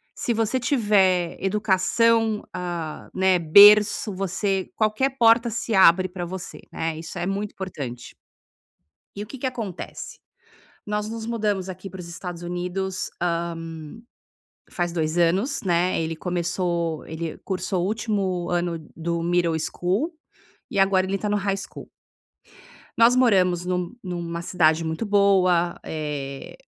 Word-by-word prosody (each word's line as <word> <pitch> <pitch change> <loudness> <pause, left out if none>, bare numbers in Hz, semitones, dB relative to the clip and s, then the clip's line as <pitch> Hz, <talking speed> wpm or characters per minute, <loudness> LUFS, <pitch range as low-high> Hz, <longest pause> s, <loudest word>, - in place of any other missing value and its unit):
se 235 - -1
você 225 +3 0
tiver 205 -8 +2
educação, 210 +3 +2
ah, 175 -4 -5
né, 190 -1 +3
berço, 205 +5 +7
você 195 0 -1
qualquer 220 +5 +1
porta 230 0 +5
se 230 0 -3
abre 185 0 +6
pra 180 -1 -5
você, 185 +1 -7
né? 160 -1 -3
Isso 165 +2 -8
é 175 - -2
muito 200 +2 -2
importante". 135 -11 -7 1.0
E 205 - -5
o - - -11
que 270 - -9
que 260 - -2
acontece? 220 -8 -6 0.7
Nós 210 0 -2
nos 225 -1 -5
mudamos 205 -5 -1
aqui 185 +1 -7
para 190 0 -10
os 170 - -7
Estados 175 0 -7
Unidos, 180 +2 -3
hã, 170 -1 +1 1.3
faz 175 -1 -2
dois 160 -1 -1
anos, 195 - +1
né. 175 -1 +1
Ele 160 0 -3
começou 170 -2 -2
ele 160 0 -5
cursou 185 -1 -2
o - - 0
último 200 -5 -1
ano 175 -1 -1 0.2
do 170 0 -2
middle 170 -1 +1
school 190 - -1 0.6
e 200 - -2
agora 190 -1 +3
ele 195 +1 -1
tá 210 - -3
no 205 - +1
high 195 -1 0
school. - - -9 1.1
Nós 230 +2 +6
moramos 185 -8 +3
num 180 +4 -2
numa 170 -2 -4
cidade 165 -2 +2
muito 160 +8 -3
boa, 185 -4 +3
eh 145 -3 -5
185 Hz, 140 wpm, -24 LUFS, 170-210 Hz, 1.3 s, berço